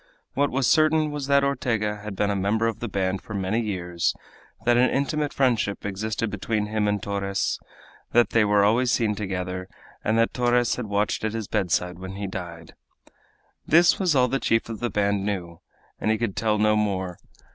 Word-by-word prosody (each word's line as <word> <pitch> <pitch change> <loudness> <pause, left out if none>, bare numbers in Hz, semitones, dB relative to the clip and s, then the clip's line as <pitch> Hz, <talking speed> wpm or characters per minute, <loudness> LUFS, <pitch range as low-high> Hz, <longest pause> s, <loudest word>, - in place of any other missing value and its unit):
What 145 +1 +1
was 130 0 0
certain 155 +1 +3
was 145 -2 -4
that 140 0 +4
Ortega 115 -6 0
had 105 -1 -7
been 105 +1 +1
a - - -1
member 100 +4 +1
of 115 -1 -1
the 120 - -3
band 95 -1 -1
for 105 - -8
many 100 +4 0
years, 90 -5 -1 0.5
that 120 0 +4
an 125 +1 +4
intimate 145 +2 -1
friendship 120 -7 0
existed 105 +2 -2
between 105 +1 -1
him 105 0 -1
and 105 0 +1
Torres, 100 -1 -1 0.5
that 120 0 +4
they 115 - +4
were 105 -1 +3
always 120 +4 +3
seen 110 -3 +1
together, 95 -2 -4 0.4
and 110 +1 +1
that 115 0 +2
Torres 120 -1 +2
had 125 -3 -5
watched 105 +1 0
at 110 0 -1
his 110 -3 -4
bedside 90 -3 -1
when 95 +1 -7
he 100 +1 -4
died. 85 -3 -7 0.9
This 170 +3 +5
was 180 -6 +2
all 125 -1 +4
the 135 +2 -1
chief 115 -2 +1
of 115 - -5
the 120 - -1
band 100 -2 0
knew, 90 -5 -4 0.4
and - - -1
he 110 - +2
could 115 -4 -2
tell 110 -1 +1
no 105 0 +3
more. 95 -4 -1
105 Hz, 195 wpm, -25 LUFS, 100-120 Hz, 0.9 s, This